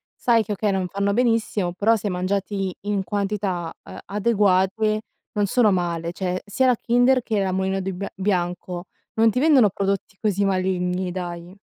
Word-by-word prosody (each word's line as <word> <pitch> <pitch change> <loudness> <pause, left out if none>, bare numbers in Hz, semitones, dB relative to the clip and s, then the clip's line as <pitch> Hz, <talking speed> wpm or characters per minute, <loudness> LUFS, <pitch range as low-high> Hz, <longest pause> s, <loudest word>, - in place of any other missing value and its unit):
sai 230 -2 +3
che 210 - -2
okay, 205 0 0
non 190 -1 -1
fanno 200 +2 -1
benissimo, 225 -6 +1
però 220 +5 +3
se 210 - -4
mangiati 195 +1 -2
in 205 -2 0
quantità, 195 -4 -2
uhm, - - -10
adeguate 210 0 +2 0.3
non 205 -1 +1
sono 215 0 +3
male, 170 -1 -2
cioè 185 -1 -2
sia 260 +6 +1
la 250 -3 +3
Kinder 245 +2 +3
che 215 -4 0
la 190 - 0
Mulino 190 +1 -1
di 190 +1 -3
bi 190 +2 -4
Bianco 180 -2 -2 0.3
non 225 0 +5
ti 245 - 0
vendono 275 -9 +5
prodotti 195 0 -2
così 205 -2 +1
maligni, 185 -1 0
dai. 175 -1 -6
195 Hz, 170 wpm, -23 LUFS, 185-215 Hz, 0.3 s, non